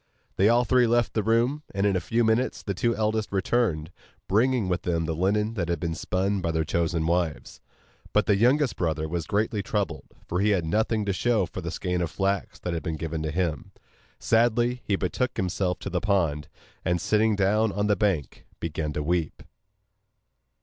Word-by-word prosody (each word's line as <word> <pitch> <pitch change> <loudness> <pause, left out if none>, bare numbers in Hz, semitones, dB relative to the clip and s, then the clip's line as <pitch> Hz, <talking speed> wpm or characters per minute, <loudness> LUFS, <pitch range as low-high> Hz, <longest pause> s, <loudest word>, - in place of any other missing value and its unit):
They 100 +3 +4
all 120 +1 +4
three 125 0 +4
left 120 0 +2
the 110 - +1
room; 115 +7 +1
and 100 +1 +1
in 100 -2 +2
a - - +2
few 115 +7 0
minutes 110 +3 +1
the 100 - -2
two 115 +5 0
eldest 110 0 -1
returned, 95 -5 0 0.4
bringing 115 +1 +2
with 90 -1 -1
them 85 -2 -1
the 80 - -1
linen 105 +6 +1
that 85 -6 -2
had 85 -2 0
been 85 0 -2
spun 95 +4 -1
by 85 - -1
their 80 -1 0
chosen 80 0 0
wives. 85 -2 -1 0.5
But - - +3
the 105 - +3
youngest 125 +5 +3
brother 80 -2 -1
was 85 0 -3
greatly 105 0 0
troubled, 95 -5 -3 0.2
for 90 - -1
he 105 +2 +3
had 95 -5 +1
nothing 110 +4 0
to 100 - 0
show 110 0 +1
for 90 +2 -7
the 85 - -4
skein 90 0 -2
of 85 - -1
flax 95 +2 -1
that 90 - -3
had 85 - -2
been 80 -3 -3
given 80 0 -4
to 80 - -2
him. 80 -2 -2 0.4
Sadly 120 +2 +2
he 100 - +1
betook 100 +7 -2
himself 90 0 -1
to - - -4
the 90 - -1
pond, 85 -7 0 0.4
and 90 0 +1
sitting 110 +3 +2
down 105 +2 +2
on 105 +1 -1
the 105 0 +3
bank, 90 -7 -1
began 80 -2 -3
to 75 - -2
weep. 85 0 -1
95 Hz, 200 wpm, -26 LUFS, 85-110 Hz, 0.5 s, They